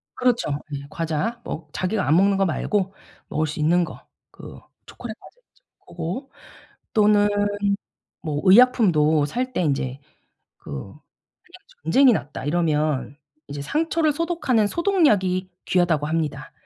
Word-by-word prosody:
그렇죠. 245 -9 +1 0.3
예. 140 - -6
과자 165 +9 -2
뭐 155 -1 -6
자기가 190 0 -1
안 150 - +4
먹는 195 +2 +4
거 195 - +2
말고 195 +3 -1 0.3
먹을 155 +1 -1
수 155 +1 -6
있는 170 +4 +3
거. 160 - -8 0.3
그 - - -12 0.3
초콜릿 230 -3 -8
과자 - - -17
있죠. - - -35 0.2
고거 175 - -6 0.6
또는 210 -1 +4 0.9
뭐 150 -3 -3
의약품도 185 - +5
살 250 - -3
때 - - 0
인제 135 -4 -1 0.6
그 - - -12
그냥 70 - -7 0.9
"전쟁이 265 -2 +5
났다." 145 -9 -4
이러면 150 -4 0 0.3
이제 145 0 -6
상처를 315 - 0
소독하는 295 -9 +1
"소독약이 205 - +1 0.2
귀하다."고 170 -5 +2
합니다. 160 -2 -3
185 Hz, 265 characters per minute, -23 LUFS, 155-240 Hz, 0.9 s, 의약품도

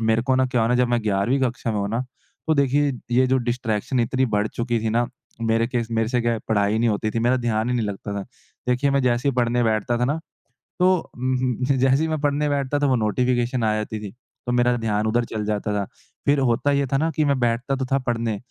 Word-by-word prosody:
मेरे 110 0 +2
को 130 +1 +1
ना 130 0 +3
क्या 125 -2 0
हुआ 115 - +2
ना 125 - +2
जब 125 0 +2
मैं 120 -2 +1
11वीं 105 +6 +1
कक्षा 125 -2 -1
में 105 - -1
हुआ 100 - -1
ना, 115 +3 -1 0.5
तो 160 - +3
देखिए 140 0 +2 0.2
ये 130 +2 +4
जो 130 +1 +2
डिस्ट्रैक्शन 120 +1 -1
इतनी 130 +3 +1
बढ़ 105 +1 +1
चुकी 120 -1 -1
थी 110 0 -1
ना, 120 +1 +1 0.4
मेरे 115 0 +2
केस 120 -2 -2
मेरे 115 -1 0
से 125 -1 +1
क्या 115 -1 0
पढ़ाई 105 0 +2
नहीं 115 - +2
होती 110 0 0
थी, 115 - -2
मेरा 120 +3 +2
ध्यान 115 -1 0
ही - - +1
नहीं 115 -3 0
लगता 100 0 -5
था, - - -4 0.5
देखिए 130 +3 +2
मैं 140 - +2
जैसे 125 +2 +1
ही - - +2
पढ़ने 120 0 +1
बैठता 110 +1 +1
था 125 - +1
ना, 145 +5 0 0.6
तो 185 -1 +2
म 130 -1 0 0.2
जैसे 135 +2 +3
ही 160 - +1
मैं 155 -1 -1
पढ़ने 145 0 +1
बैठता 140 0 0
तो 145 - +2
वो 130 - +3
नोटिफिकेशन 120 +2 0
आ 110 -1 +2
जाती 110 0 -3
थी, 105 -2 -6 0.4
तो 120 - -1
मेरा 125 0 +3
ध्यान 110 -1 0
उधर 120 +2 +2
चल 110 -2 -4
जाता 105 0 -1
था, 100 -1 0 0.4
फिर 145 0 +3
होता 130 +2 +2
ये 140 0 +2
था 135 - 0
ना 160 +3 +1
कि 155 - +2
मैं 140 -2 +1
बैठता 120 +3 0
तो 130 -1 -2
था 135 - +4
पढ़ने, 115 -3 -1
120 Hz, 250 wpm, -23 LUFS, 110-130 Hz, 0.6 s, ये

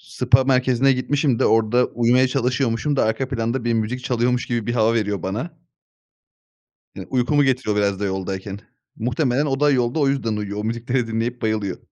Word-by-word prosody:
spa 125 +1 +2
merkezine 130 0 +3
gitmişim 135 0 0
de, - - +2
orda 115 +2 +3
uyumaya 125 +2 +2
çalışıyormuşum 130 +1 0
da - - +2
arka 110 +4 -1
planda 120 0 -2
bir 120 - +1
müzik 115 +3 -2
çalıyormuş 125 0 0
gibi 120 -2 -2
bir 120 - -1
hava 115 -1 +2
veriyor 105 -5 -1
bana. 105 - -3 1.4
Ya, - - -7
uykumu 135 +3 +2
getiriyor 130 -5 0
biraz 100 -1 0
da 105 - -1
yoldayken. 95 +1 -4 0.4
Muhtemelen 125 +4 0
o 135 0 -2
da 150 - +4
yolda 125 +1 0
o 140 - +3
yüzden 115 -6 -1
uyuyor, 105 0 -4
o 105 - -3
müzikleri 120 +2 -1
dinleyip 115 +2 -3
bayılıyor. 105 -4 -2
120 Hz, 175 wpm, -21 LUFS, 110-130 Hz, 1.4 s, da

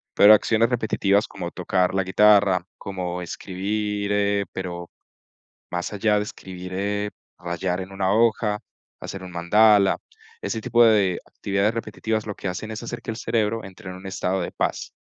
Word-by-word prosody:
pero 105 +1 +9
acciones 110 +2 +3
repetitivas 105 -3 +1
como 90 -2 -6
tocar 90 +1 0
la 95 -1 +1
guitarra, 100 -1 +4
como 90 -2 -4
escribir, 100 +3 -3
eh, 100 0 +1
pero, 85 -2 -5 0.8
más 90 +3 -3
allá 105 +1 +2
de 105 - +1
escribir, 90 -2 -9
eh, 105 +1 -1 0.3
rayar 90 +1 -2
en 95 +1 -7
una 95 0 0
hoja, 110 -2 +2 0.4
hacer 95 - -7
un 95 - -8
mandala, 100 +3 +4 0.4
ese 115 - -2
tipo 120 +1 +4
de 100 -5 +3
actividades 100 +2 -1
repetitivas 110 -1 -3
lo 105 - -4
que 95 - -5
hacen 110 +5 -5
es 110 - -6
hacer 115 - -5
que 115 - -4
el - - -7
cerebro 115 -1 0
entre 95 0 -10
en - - -7
un 95 +1 -10
estado 95 0 -1
de - - -4
paz - - -2
100 Hz, 165 wpm, -24 LUFS, 95-105 Hz, 0.8 s, pero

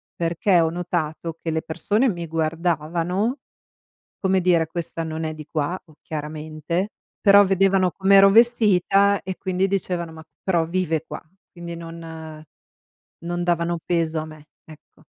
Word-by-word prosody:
perché 170 +2 +2
ho 165 - +2
notato 165 -2 -3
che 165 - -2
le 160 0 -1
persone 205 +11 0
mi 175 -6 -2
guardavano, 170 - -1 0.8
come 190 -1 +2
dire: 170 -2 +3
"Questa 165 0 -5
non 160 0 -4
è 155 - -2
di 155 -1 -10
qua 160 +4 -1 0.2
chiaramente". 155 +4 -4 0.3
Però 200 -1 +8
vedevano 195 -1 +3
com'ero 195 +3 +6
vestita 200 -3 +4
e 185 0 -5
quindi 185 0 0
dicevano: 180 -4 -2
"Ma 160 0 -11 0.2
però 170 -4 +1
vive 165 -2 -1
qua", - - -7 0.3
quindi 170 -1 -8
non 160 -2 -9 0.7
non 175 +1 -4
davano 170 -1 0
peso 165 -2 0
a 155 - -4
me, 155 -1 -13 0.2
ecco. 155 -2 -17
170 Hz, 140 wpm, -23 LUFS, 160-190 Hz, 0.8 s, Però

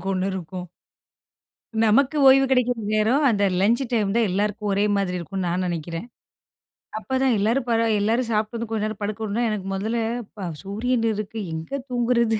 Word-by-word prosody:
அவுங்களுக்கு 190 - -5
ஒண்ணு 190 +1 0
இருக்கும். 180 0 -6 1.2
நமக்கு 275 +7 +3
ஓய்வு 270 0 +6
கிடைக்கிற 250 -1 +2 0.2
நேரம் 235 +8 +3
அந்த 205 -2 +1 0.2
லஞ்ச் 230 +7 +3
டைம் 210 -3 +1
தான் 225 -4 +3
எல்லாருக்கும் 210 +2 -1
ஒரே 200 +1 +2
மாதிரி 185 -2 -1
இருக்குன்னு 185 +1 -3
நான் 180 +2 0
நெனைக்கிறேன். 170 +3 -4 0.9
அப்ப 260 +4 -2
தான் 260 -3 +3
எல்லாரும் 235 +5 +1
பழ 230 -1 +3 0.2
எல்லாரும் 230 +3 +1
சாப்பிட்டு 215 +2 -1
வந்து 230 -1 -5
கொஞ்ச 220 -2 -1
நேரம் 215 -1 -7
படுக்கணுன்னா, 215 +2 -2
எனக்கு 195 -3 -4
மொதல்ல 220 +4 -1 0.4
ப 190 -4 -4
சூரியன் 230 +4 0
இருக்கு. 215 +1 -5
எங்க 160 +6 -6 0.2
தூங்குறது? 235 -2 +2
215 Hz, 165 wpm, -23 LUFS, 195-235 Hz, 1.2 s, ஓய்வு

